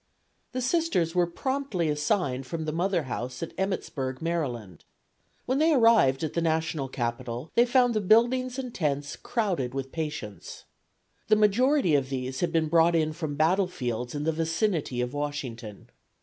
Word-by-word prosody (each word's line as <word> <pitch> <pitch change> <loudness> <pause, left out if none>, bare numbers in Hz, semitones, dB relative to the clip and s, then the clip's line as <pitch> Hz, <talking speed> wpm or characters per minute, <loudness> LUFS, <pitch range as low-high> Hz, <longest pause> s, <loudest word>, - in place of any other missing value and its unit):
The 255 0 -2
Sisters 260 - +1
were 175 -1 +2
promptly 260 - -2
assigned 150 -3 0
from 160 +2 -4
the 155 - -2
mother 175 +1 0
house 125 +1 -5
at 165 - -6
Emmittsburg, 150 -9 -2
Md. 125 - -3 0.7
When 260 +2 0
they 320 +1 +4
arrived 225 - +4
at 155 - -2
the 170 - 0
National 160 -3 0
Capital 120 +2 -4
they 240 +1 +4
found 245 -1 +4
the 215 - 0
buildings 245 +5 +3
and 255 -3 -5
tents 145 -3 -2
crowded 185 - -2
with 135 -1 -4
patients. 150 - -6 0.6
The 215 - +5
majority 215 - +3
of 135 -2 +2
these 130 -1 -3
had 175 - 0
been 160 -1 +1
brought 165 +1 +4
in 155 -1 +1
from 155 -3 -4
battlefields 150 - 0
in 145 - -2
the 160 - +1
vicinity 165 - -1
of 125 +2 -3
Washington. 130 -8 -5
160 Hz, 160 wpm, -27 LUFS, 135-210 Hz, 0.7 s, The